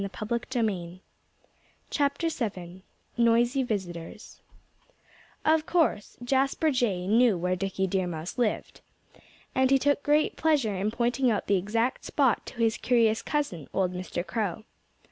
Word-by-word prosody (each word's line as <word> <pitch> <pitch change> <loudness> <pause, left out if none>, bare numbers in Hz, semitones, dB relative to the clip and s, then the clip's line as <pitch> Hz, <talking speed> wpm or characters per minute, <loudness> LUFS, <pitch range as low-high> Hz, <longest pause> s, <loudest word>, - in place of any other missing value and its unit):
VII 200 -3 -3 2.2
NOISY 235 +3 +3
VISITORS 180 -8 -6 1.0
Of 315 0 +3
course 320 - +1
Jasper 275 +5 +1
Jay 210 -9 0
knew 225 0 +4
where 180 +1 0
Dickie 190 0 -2
Deer 185 -1 0
Mouse 170 +6 -5
lived. 230 -4 -1 0.7
And 260 0 +3
he 270 - +5
took 285 +1 +1
great 300 +1 +2
pleasure 290 -9 +2
in 195 +3 0
pointing 240 +3 +1
out 210 -3 0
the 200 - +2
exact 225 +7 -1
spot 275 -6 +1
to - - -9
his 225 -1 +2
curious 230 -3 +2
cousin, 235 - -2
old 185 -2 +1
Mr. 180 -1 -4
Crow. 205 +2 -3
225 Hz, 125 wpm, -27 LUFS, 185-260 Hz, 2.2 s, he